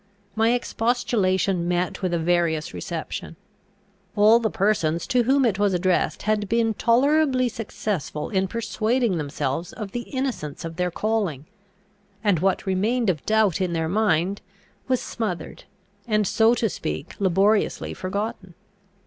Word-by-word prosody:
My 225 +2 +3
expostulation 200 -7 0
met 180 +2 -1
with 185 -2 0
a 170 - +1
various 165 -2 0
reception. 165 -1 -5 0.8
All 215 +2 +6
the 225 -2 0
persons 175 -6 0
to 250 - +2
whom 270 +1 +3
it 205 -4 +1
was 205 -2 +2
addressed 180 0 0
had 210 -1 0
been 230 -1 +2
tolerably 255 +3 +3
successful 205 - -4
in 190 -2 +1
persuading 225 -1 0
themselves 145 +2 -3
of 210 -4 -6
the 240 +2 -5
innocence 255 - -3
of 165 0 -7
their 180 0 0
calling; 190 -7 -1 0.8
and 200 -6 +3
what 190 +2 +1
remained 210 +4 +1
of 155 -5 -7
doubt 215 -4 +2
in 180 -2 0
their 160 -1 0
mind 190 -1 +1 0.5
was 255 -1 +2
smothered, 210 -7 -5 0.4
and, 215 -2 +2
so 225 +2 +4
to 230 - +1
speak, 75 - -5
laboriously 200 +2 +2
forgotten. 190 -1 -4
200 Hz, 140 wpm, -24 LUFS, 175-225 Hz, 0.8 s, All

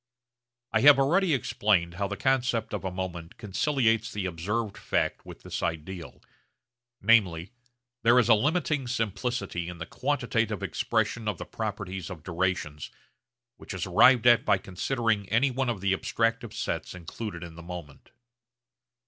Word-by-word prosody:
I 110 - +2
have 145 0 +8
already 170 +7 +3
explained 95 -8 +1
how 100 +3 -2
the 100 0 -5
concept 125 -3 0
of 105 - -3
a 95 - -1
moment 90 -2 -6
conciliates 115 +1 +1
the 100 -2 -3
observed 100 +5 -2
fact - - -2
with - - -11
this - - -5
ideal; 85 +2 -5 0.8
namely, 95 -5 +3 0.5
there 120 +1 +5
is 120 -3 +5
a 115 - +7
limiting 150 +2 +1
simplicity 110 -5 -2
in 90 - -8
the 85 - -5
quantitative - - -1
expression 115 -2 -1
of 105 -5 -1
the - - -6
properties 100 -4 -5
of 85 -5 -9
durations, 85 -5 -2 0.7
which - - -8
is 90 - -3
arrived 120 +7 +5
at 120 -1 +6
by 100 - +3
considering 100 +2 -1
any 120 +6 +3
one 130 0 -1
of 110 -6 -3
the 95 -1 +2
abstractive 115 +3 -1
sets - - -4
included 90 +1 -7
in 85 -1 -9
the 85 - -11
moment. 85 -4 -9
105 Hz, 150 wpm, -28 LUFS, 90-120 Hz, 0.8 s, have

